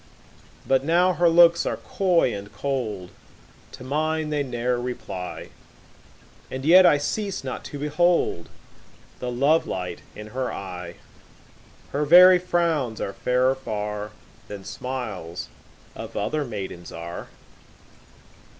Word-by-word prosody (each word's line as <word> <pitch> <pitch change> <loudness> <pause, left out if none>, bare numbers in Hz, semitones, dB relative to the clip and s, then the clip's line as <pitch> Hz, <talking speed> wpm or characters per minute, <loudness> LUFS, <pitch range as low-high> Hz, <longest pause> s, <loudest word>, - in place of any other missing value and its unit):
But 135 0 +3
now 175 +4 +3
her 175 -1 +3
looks 170 0 +6
are - - -2
coy 180 -9 +1
and 100 0 -7
cold, 110 -6 -3 0.6
To - - -10
mine 155 +3 -1
they 150 -1 0
ne'er 125 -2 -1
reply, 110 -7 -6 1.0
And 130 +1 -5
yet 180 +3 +8
I 145 - +5
cease 195 +4 -3
not 130 -1 -5
to 145 - -7
behold 150 - +1 0.7
The 125 - -3
love 140 +6 +2
light 90 -2 -4
in 105 0 -9
her 130 +2 -3
eye: 90 -2 -7 1.0
10 140 - -2
Her 150 - +1
very 180 +4 +8
frowns 165 -10 0
are 100 - -3
fairer 125 +3 +2
far 105 -5 -4 0.4
Than 100 -2 -8
smiles 110 -7 -5 0.5
of - - -7
other 155 -1 -1
maidens 95 -7 -7
are. 85 +1 -7
130 Hz, 125 wpm, -24 LUFS, 105-160 Hz, 1.0 s, yet